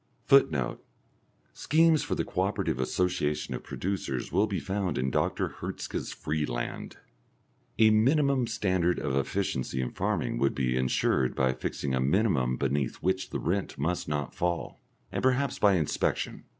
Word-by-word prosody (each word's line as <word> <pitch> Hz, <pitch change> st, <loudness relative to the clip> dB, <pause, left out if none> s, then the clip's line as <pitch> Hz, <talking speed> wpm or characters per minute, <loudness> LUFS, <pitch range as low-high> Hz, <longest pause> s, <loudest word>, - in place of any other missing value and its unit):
[Footnote: 80 Hz, -, +3 dB, 0.7 s
Schemes 160 Hz, +1 st, +3 dB
for -, -, -2 dB
the -, -, -1 dB
co -, -, -2 dB
operative -, -, -1 dB
association 75 Hz, +2 st, 0 dB
of -, -, -4 dB
producers 90 Hz, -10 st, -3 dB
will 100 Hz, +6 st, +3 dB
be 100 Hz, -3 st, -2 dB
found 95 Hz, -2 st, -2 dB
in 65 Hz, +1 st, 0 dB
Dr. -, -, -1 dB
Hertzka's -, -, -4 dB
Freeland.] 75 Hz, -6 st, -3 dB, 0.8 s
A 110 Hz, -1 st, +6 dB
minimum 135 Hz, +3 st, +3 dB
standard 90 Hz, -4 st, +1 dB
of 70 Hz, -2 st, -2 dB
efficiency 70 Hz, -3 st, -1 dB
in 65 Hz, -, -2 dB
farming -, -, -1 dB
would 70 Hz, -, +1 dB
be 65 Hz, -2 st, 0 dB
insured 65 Hz, 0 st, +1 dB
by 65 Hz, -1 st, +2 dB
fixing 65 Hz, +1 st, -3 dB
a 65 Hz, -, +1 dB
minimum 70 Hz, -, +2 dB
beneath 70 Hz, -1 st, 0 dB
which 95 Hz, +1 st, -1 dB
the -, -, -3 dB
rent 95 Hz, +2 st, -2 dB
must 80 Hz, +6 st, -1 dB
not 75 Hz, -2 st, -2 dB
fall, 85 Hz, -1 st, -2 dB, 0.3 s
and -, -, -2 dB
perhaps 130 Hz, +1 st, +1 dB
by 100 Hz, -2 st, +5 dB
inspection. 80 Hz, -4 st, -1 dB
85 Hz, 150 wpm, -28 LUFS, 65-100 Hz, 0.8 s, A